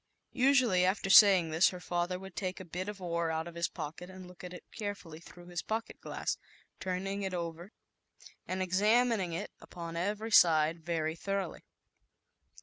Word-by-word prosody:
Usu 270 0 +4
ally, 185 -6 +2
after 190 +1 +1
saying 190 -6 +8
this, 160 +3 +5
her 180 - -8
father 175 0 -2
w 185 - -8
r - - -7
ould 175 - -25
take 185 -2 -3
a 185 - -8
bit 180 +4 -5
of 205 -1 -7
ore 170 -2 -1
out 160 +1 -2
of 170 - -8
his 170 +1 -1
pocket 165 +2 -7
and 185 0 -10
look 180 0 -14
at 180 - -7
it 180 - -10
carefully 200 -7 -6
through 175 +1 -14
his 175 -1 -4
pocket 220 +1 -4
glass, - - -3 0.4
turning 195 +2 -3
it 190 -2 -3
over, 170 +2 -5 0.8
and 185 +1 -1
examining 210 +1 +2
it 195 +5 -4
upon 170 -1 -8
every 210 +6 -2
side 165 -3 +5
very 160 -1 -1
thoroughly. 195 -1 -4
180 Hz, 185 wpm, -32 LUFS, 170-195 Hz, 0.8 s, saying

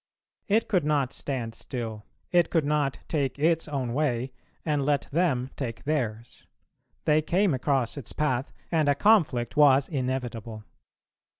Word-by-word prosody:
It 220 +1 +2
could 185 -6 +2
not 145 -3 +1
stand 125 -5 -4
still, 115 -3 -6 0.3
it 175 -2 +4
could 160 -4 +1
not 145 -2 0
take 140 -5 -1
its 165 +3 +2
own 135 -5 -2
way, 130 -3 0 0.3
and 150 -3 +1
let 145 0 +1
them 140 -6 +1
take 115 -4 -5
theirs: 120 -6 -3 0.6
they 155 0 +4
came 180 +3 +2
across 130 -1 0
its 135 - -7
path, 135 -3 -1 0.2
and 155 -4 +2
a 140 - +4
conflict 145 - +3
was 140 -2 +5
inevitable. 120 -6 -3
140 Hz, 140 wpm, -27 LUFS, 125-155 Hz, 0.6 s, was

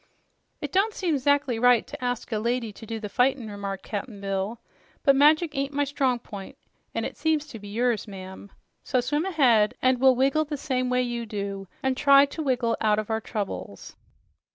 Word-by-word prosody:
"It - - -4
don't 410 +3 +2
seem 345 -5 0
'zactly 285 -3 +1
right 245 -2 +5
to - - -9
ask 245 -1 -3
a 215 - 0
lady 235 -1 -1
to 225 - -12
do 225 0 -4
the 210 - -5
fightin'," 245 0 +1
remarked 200 -1 -5
Cap'n 210 0 -5
Bill, 195 +3 -3 0.4
"but 275 - +5
magic 300 +3 +4
ain't 275 +1 -2
my 290 - +2
strong 270 -3 0
p'int, 200 -4 -10 0.4
and - - -1
it - - -5
seems 315 -2 +1
to 255 -7 -10
be 205 - -10
yours, 230 +1 0
ma'am. 190 0 -9 0.3
So 255 - +1
swim 290 +7 0
ahead, 245 - +3
and 255 -1 +2
we'll 260 0 +5
wiggle 275 +5 +2
the 295 0 -4
same 255 -3 -1
way 250 0 +2
you 240 -1 -3
do, 200 -2 -5 0.2
an' 265 0 +2
try 275 +1 +6
to 285 +3 -6
wiggle 250 -5 +1
out 215 -1 +3
of 215 +1 -3
our 220 0 0
troubles." 200 - -6
245 Hz, 200 wpm, -26 LUFS, 215-275 Hz, 0.4 s, try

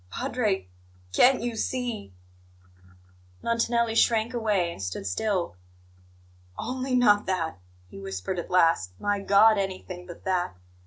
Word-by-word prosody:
"Padre, 210 - -1 0.5
can't 255 - +5
you 240 -1 -2
see 240 - -3 0.6
" 90 0 -27
Montanelli 235 0 +1
shrank 225 +1 +3
away, 210 -7 +1
and 95 - -9
stood 90 +1 -4
still. 175 - -1 1.0
"Only 255 0 -2
not 210 -4 +4
that!" 165 - -2 0.3
he 95 - -11
whispered 95 - -4
at 170 - -6
last. 165 - +3
"My 205 0 0
God, 200 +2 +5
anything 185 -2 -5
but 175 - -11
that! 180 - -1
190 Hz, 125 wpm, -26 LUFS, -, 1.0 s, can't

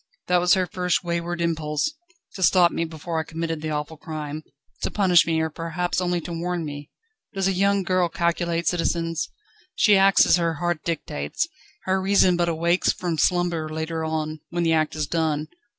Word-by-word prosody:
That 180 0 +3
was 175 +1 +4
her 185 -1 +1
first 180 0 -1
wayward 170 0 -2
impulse 160 - -1 0.4
to 190 - -8
stop 180 -1 +5
me 170 - -1
before 160 +1 -4
I - - -1
committed 165 0 -4
the 155 - -3
awful 150 +1 -3
crime, 155 -1 -6 0.4
to - - -1
punish 185 -5 +4
me, 165 -1 +1
or 160 0 -1
perhaps 170 +3 -2
only 175 -1 0
to 170 - -6
warn 170 0 -2
me. 145 -1 -7 0.5
Does 195 -1 +1
a - - +2
young 200 +1 +2
girl 185 -1 +1
calculate, 170 0 -1
citizens? 165 -2 0 0.5
She 210 - +5
acts 195 0 +6
as - - +5
her 170 -1 0
heart 175 0 -2
dictates; 75 - -2 0.4
her 190 0 0
reason 190 -2 +4
but 175 0 +1
awakes 170 +2 +2
from 170 -3 -3
slumber 175 -3 +1
later 160 +1 -3
on, 155 -1 -2
when 175 0 -1
the 165 -1 +3
act 155 -1 +1
is 155 -1 -1
done. 155 -1 -1
170 Hz, 185 wpm, -24 LUFS, 160-180 Hz, 0.5 s, acts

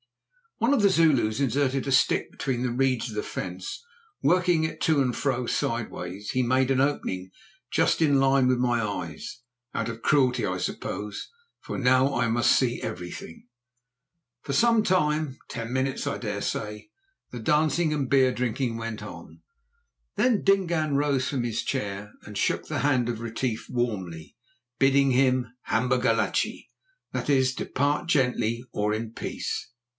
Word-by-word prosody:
One 235 +5 +2
of 230 - +2
the 200 - +6
Zulus 145 - +3
inserted 135 0 +1
a - - -1
stick 130 - +3
between 130 -3 -2
the 125 - 0
reeds 130 -1 +1
of 110 - -8
the 105 - -1
fence. 90 - -6 0.4
Working 180 -2 +3
it 160 - -3
to 155 -4 +3
and 125 -2 0
fro 130 -3 -1
sideways, 105 -5 -3
he 130 - +1
made 130 +2 +2
an 135 -1 +3
opening 95 -10 -1 0.4
just - - +2
in 150 -3 +4
a - - +4
line 135 -1 +4
with 130 0 +3
my 120 -1 +2
eyes—out 120 +7 -6
of 115 0 -7
cruelty, 130 -4 +3
I 90 - -1
suppose, 100 +3 -4 0.3
for - - -5
now 130 +1 +3
I 120 -1 +2
must 120 +1 +3
see 125 -2 0
everything. 90 +1 -7 0.9
For 140 - -4
some 230 +2 +4
time—ten 150 - -1
minutes, 130 +2 -1
I 140 - -1
dare 105 -3 -3
say—the 125 - -7
dancing 155 +6 +2
and 140 -4 -1
beer 130 -2 +4
drinking 125 -1 -1
went 115 -1 -5
on. - - -10 0.7
Then 245 -4 +2
Dingaan 170 -7 +2
rose 140 -2 +1
from 130 -4 -1
his 115 -2 -2
chair 105 -5 -3
and 105 -1 -8
shook - - 0
the - - -2
hand 130 -4 +2
of 115 -2 -3
Retief 115 0 -3
warmly, 100 -8 -3 0.4
bidding 135 0 +4
him 125 -1 +2
"Hamba 125 +2 +1
gachlé," 125 - 0 0.5
that - - -3
is, 130 -2 +3
Depart 145 +5 -1
gently, 125 -6 +1
or 105 0 0
in 110 +1 -3
peace. 135 - -4
130 Hz, 155 wpm, -26 LUFS, 115-140 Hz, 0.9 s, the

